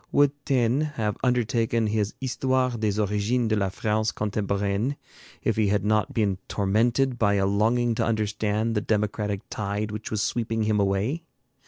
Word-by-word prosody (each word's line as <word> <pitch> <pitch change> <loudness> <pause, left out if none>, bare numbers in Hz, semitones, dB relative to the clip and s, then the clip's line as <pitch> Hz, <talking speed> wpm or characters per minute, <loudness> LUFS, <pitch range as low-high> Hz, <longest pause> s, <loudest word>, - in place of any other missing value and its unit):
Would 145 -1 +4 0.2
Taine 125 0 +2 0.2
have 105 -3 0
undertaken 120 -2 +1
his 105 -1 -1
'Histoire 130 0 0
des 110 -3 -1
origines 105 +4 +1
de 110 - +2
la 100 -2 +1
France 110 +2 0
contemporaine' 100 +4 -1 0.5
if - - 0
he 110 -2 +3
had 105 0 +1
not 105 0 +2
been 100 -4 0
tormented 115 +6 +1
by 100 -2 +3
a 95 -1 +2
longing 115 +4 +2
to - - 0
understand 110 0 0
the 105 - 0
democratic 105 -1 -1
tide 105 +1 -2
which 105 0 -5
was 110 -1 -1
sweeping 115 -1 -1
him 105 -1 +1
away? 100 - 0
110 Hz, 160 wpm, -25 LUFS, 105-115 Hz, 0.5 s, Would